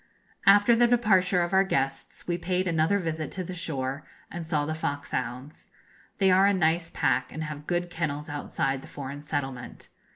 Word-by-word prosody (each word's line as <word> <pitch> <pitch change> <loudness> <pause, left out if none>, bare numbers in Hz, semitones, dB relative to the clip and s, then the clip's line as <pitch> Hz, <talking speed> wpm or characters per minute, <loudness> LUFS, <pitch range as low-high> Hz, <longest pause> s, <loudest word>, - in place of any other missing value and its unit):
After 205 +4 +7
the 240 +1 +5
departure 190 -7 +3
of 175 - -3
our 190 0 +6
guests 135 -8 -2
we 175 - 0
paid 180 +2 -1
another 165 +3 +2
visit 160 -5 -3
to 185 - -3
the 185 - -6
shore, 140 -5 -3 0.3
and 170 -1 -6
saw 150 -3 0
the 155 - -2
foxhounds. 145 -2 -4 0.5
They 190 -2 +4
are 190 +2 +6
a 200 - +3
nice 165 -1 +1
pack, 130 - 0
and 155 - -5
have 150 -1 -7
good 175 0 -1
kennels 150 -3 -3
outside 140 -2 -2
the - - -12
foreign 140 +1 -7
settlement. 135 -4 -5
165 Hz, 175 wpm, -27 LUFS, 145-185 Hz, 0.5 s, After